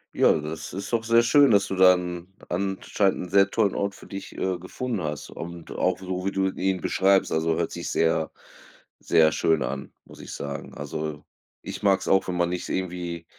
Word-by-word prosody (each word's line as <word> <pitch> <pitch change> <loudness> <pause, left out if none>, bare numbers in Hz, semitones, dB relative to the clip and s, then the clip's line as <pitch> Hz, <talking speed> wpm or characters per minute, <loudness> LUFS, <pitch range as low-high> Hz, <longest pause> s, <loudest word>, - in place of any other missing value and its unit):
Ja, - - +5
das 75 +1 -6
ist 100 +5 -6
doch 115 -1 +1
sehr 115 0 +5
schön, 140 +2 +5
dass 100 -1 +4
du 95 - -3
dann 90 -1 +3
anscheinend 95 0 -1
'n - - -14
sehr 100 0 +4
tollen 105 -4 +1
Ort 100 0 -1
für - - -14
dich, 95 0 -7
äh, 95 -1 -1
gefunden 100 +2 -4
hast 75 -1 -4
und 85 0 -8
auch 90 0 0
so 95 0 -4
wie 100 - 0
du 95 0 +1
ihn 95 -1 -1
beschreibst. 95 +1 +2
Also 80 0 +1
hört - - -1
sich - - -5
sehr, 80 -1 +1 0.7
sehr 80 -1 +4
schön 80 -3 +2
an, 65 +2 -5
muss - - -14
ich - - -9
sagen. 70 -1 -6
Also, 75 +1 -5 0.4
ich - - -7
mag's 100 -1 +2
auch, 95 0 +3
wenn 90 - -2
man 85 0 +1
nicht 90 0 -4
irgendwie 85 -2 -3
90 Hz, 195 wpm, -25 LUFS, 80-100 Hz, 0.7 s, Ja